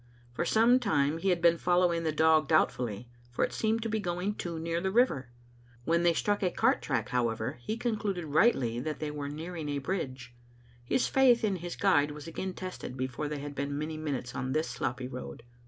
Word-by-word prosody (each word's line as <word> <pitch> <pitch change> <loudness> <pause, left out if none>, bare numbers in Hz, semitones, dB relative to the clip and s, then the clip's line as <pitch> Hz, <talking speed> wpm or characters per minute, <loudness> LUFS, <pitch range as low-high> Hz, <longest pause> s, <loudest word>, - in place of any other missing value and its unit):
For - - -1
some 235 +3 +5
time 155 - +1
he 195 - 0
had 175 -2 +1
been 170 -1 +5
following 175 -1 +2
the 160 -1 0
dog 155 -1 +4
doubt 155 +1 +4
fully, 120 -2 -5 0.2
for 120 - +1
it - - -8
seemed 225 0 0
to - - -1
be 220 0 -1
going 180 +1 -2
too 170 -5 -5
near 165 +1 -2
the 190 - 0
river. 190 - +2 0.6
When 170 +1 +2
they 170 0 +4
struck 205 +3 0
a 185 - +2
cart - - +2
track, - - -1
however, 120 +1 -1
he 220 - -3
concluded 210 -7 -2
rightly 140 - +2
that 150 +4 -3
they 155 -1 -4
were 145 -1 -4
nearing 160 +1 -5
a 145 - -1
bridge. 130 -6 -4 0.5
His 245 - +1
faith 255 -3 +4
in 200 -3 +1
his 175 0 -6
guide 145 -7 +3
was 150 0 -8
again 185 +3 -4
tested 185 -8 -6
before 130 +3 -3
they 150 0 -3
had 145 0 -6
been 140 +1 -3
many 155 +1 -3
minutes 140 -6 -4
on 130 0 -3
this 155 +2 0
sloppy 125 +1 -3
road. 125 -2 -8
160 Hz, 210 wpm, -30 LUFS, 140-185 Hz, 0.6 s, some